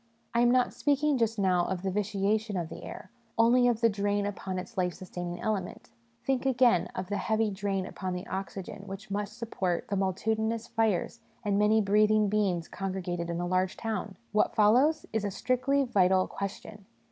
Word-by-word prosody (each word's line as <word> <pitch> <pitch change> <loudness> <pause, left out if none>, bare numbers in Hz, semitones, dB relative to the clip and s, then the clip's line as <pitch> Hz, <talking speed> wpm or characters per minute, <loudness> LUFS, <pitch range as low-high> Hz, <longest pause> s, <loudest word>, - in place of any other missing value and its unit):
I 235 - +2
am 240 - +5
not 250 0 +3
speaking 290 -1 +1
just 225 -1 +1
now 185 -3 +2
of 185 -1 -3
the 190 - 0
vitiation 210 +1 0
of 170 -2 -3
the 165 - -9
air 185 - -9 0.3
only 240 +2 +5
of 235 -1 +1
the 230 - +6
drain 205 -1 0
upon 190 -2 -4
its 210 +6 -6
life 180 -3 0
sustaining 175 -1 -6
element. 205 -4 -3 0.3
Think, 265 -2 +1
again, 250 -7 +3
of 185 0 -4
the 205 - -1
heavy 220 -1 +1
drain 195 -1 -2
upon 185 -1 -4
the 180 - -5
oxygen 195 0 -5
which 195 +1 -8
must 205 0 -3
support 185 -6 -2
the 200 - 0
multi 195 +3 0
tudinous 220 +1 -2
fires 225 -1 0 0.3
and 200 -1 +2
many 215 +1 +4
breathing 210 +1 +3
beings 195 -5 0
congregated 185 -3 -3
in 170 0 -2
a 175 - -1
large 185 +1 0
town! 220 -3 -3
' - - -38
What 210 - +2
follows? 250 +9 +4
' - - -36
is 220 -2 0
a 205 - 0
strictly 255 +7 +1
vital 190 -6 +3
question. 200 0 -7
205 Hz, 195 wpm, -29 LUFS, 185-225 Hz, 0.3 s, the